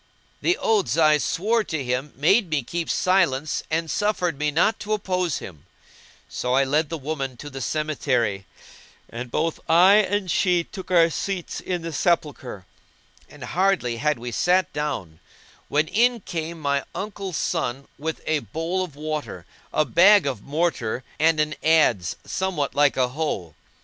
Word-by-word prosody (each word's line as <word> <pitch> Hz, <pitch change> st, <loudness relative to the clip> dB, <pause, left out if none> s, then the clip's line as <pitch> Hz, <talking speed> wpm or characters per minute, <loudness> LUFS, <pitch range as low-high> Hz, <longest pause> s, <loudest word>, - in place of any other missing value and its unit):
The 355 Hz, -, +2 dB
oaths 190 Hz, -, +1 dB
I 155 Hz, -2 st, +5 dB
swore 220 Hz, +9 st, +1 dB
to 155 Hz, -4 st, -3 dB
him 125 Hz, +3 st, -2 dB
made 180 Hz, -, +3 dB
me 150 Hz, -4 st, 0 dB
keep 170 Hz, +7 st, -4 dB
silence 160 Hz, -6 st, +1 dB
and 165 Hz, +1 st, 0 dB
suffered 180 Hz, -3 st, 0 dB
me 150 Hz, 0 st, +1 dB
not 170 Hz, +9 st, +2 dB
to 215 Hz, +1 st, -2 dB
oppose 185 Hz, -6 st, -1 dB
him; 80 Hz, -6 st, -10 dB, 0.6 s
so 125 Hz, -, -1 dB
I 135 Hz, -, +4 dB
led 150 Hz, +3 st, +1 dB
the 165 Hz, -, -3 dB
woman 135 Hz, -3 st, -4 dB
to 145 Hz, +4 st, -9 dB
the 135 Hz, 0 st, -7 dB
cemetery 130 Hz, -8 st, -1 dB, 0.6 s
and 120 Hz, +2 st, -6 dB
both 165 Hz, +6 st, -1 dB
I 180 Hz, +5 st, +7 dB
and 205 Hz, -3 st, +1 dB
she 180 Hz, -1 st, +2 dB
took 190 Hz, +2 st, -10 dB
our 170 Hz, -2 st, +5 dB
seats 190 Hz, +1 st, -3 dB
in 180 Hz, -2 st, -3 dB
the 165 Hz, -1 st, -5 dB
sepulchre; 145 Hz, -, -1 dB, 0.6 s
and -, -, -12 dB
hardly 180 Hz, -11 st, +1 dB
had 150 Hz, +3 st, +1 dB
we 120 Hz, +1 st, -6 dB
sat 180 Hz, +8 st, +2 dB
down 140 Hz, -, -4 dB, 0.5 s
when 150 Hz, +2 st, +1 dB
in 240 Hz, +5 st, +2 dB
came 165 Hz, -1 st, -5 dB
my 140 Hz, -2 st, 0 dB
uncle's 195 Hz, -3 st, -4 dB
son, 135 Hz, +3 st, -2 dB
with 160 Hz, +2 st, -4 dB
a 155 Hz, -1 st, +1 dB
bowl 165 Hz, +5 st, -3 dB
of 165 Hz, -6 st, -8 dB
water, 145 Hz, -, -5 dB, 0.3 s
a 155 Hz, -, +2 dB
bag 185 Hz, -, +6 dB
of 130 Hz, -7 st, -2 dB
mortar 140 Hz, -6 st, -1 dB, 0.2 s
and 160 Hz, 0 st, +3 dB
an 155 Hz, 0 st, +1 dB
adze 150 Hz, -, +3 dB
somewhat 185 Hz, -7 st, -2 dB
like 145 Hz, -1 st, +3 dB
a 125 Hz, -1 st, +2 dB
hoe. 125 Hz, -, -3 dB
155 Hz, 160 wpm, -24 LUFS, 135-180 Hz, 0.6 s, I